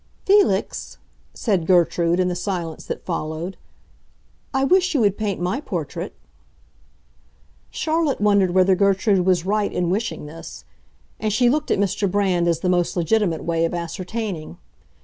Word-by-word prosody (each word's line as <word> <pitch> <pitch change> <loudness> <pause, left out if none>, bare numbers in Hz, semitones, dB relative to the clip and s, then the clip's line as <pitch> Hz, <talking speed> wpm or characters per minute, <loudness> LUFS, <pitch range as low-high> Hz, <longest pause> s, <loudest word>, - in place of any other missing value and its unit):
"Felix," 390 - +2 0.4
said 190 -8 0
Gertrude, 175 -1 +3
in 180 - +2
the 180 - -1
silence 175 -3 -4
that - - -6
followed, 165 +1 -4 1.0
"I 265 0 +1
wish 365 +3 +3
you 270 - +3
would 205 -2 +3
paint 205 -3 -2
my 180 +10 -1
portrait." - - -5 1.5
Charlotte 320 -3 0
wondered 200 -3 +3
whether 190 0 +5
Gertrude 195 0 +2
was 180 -2 +2
right 205 +1 0
in 175 -1 -1
wishing 210 -4 -2
this; 160 +2 -10 0.5
and 215 0 -1
she 240 +3 +3
looked 300 +2 -1
at - - +2
Mr. 200 0 0
Brand 185 -3 +1
as 165 -1 +1
the - - -1
most 180 0 +1
legitimate 175 -1 +1
way 165 -1 0
of 165 +1 0
ascertaining. 175 - -5
190 Hz, 150 wpm, -22 LUFS, 175-215 Hz, 1.5 s, whether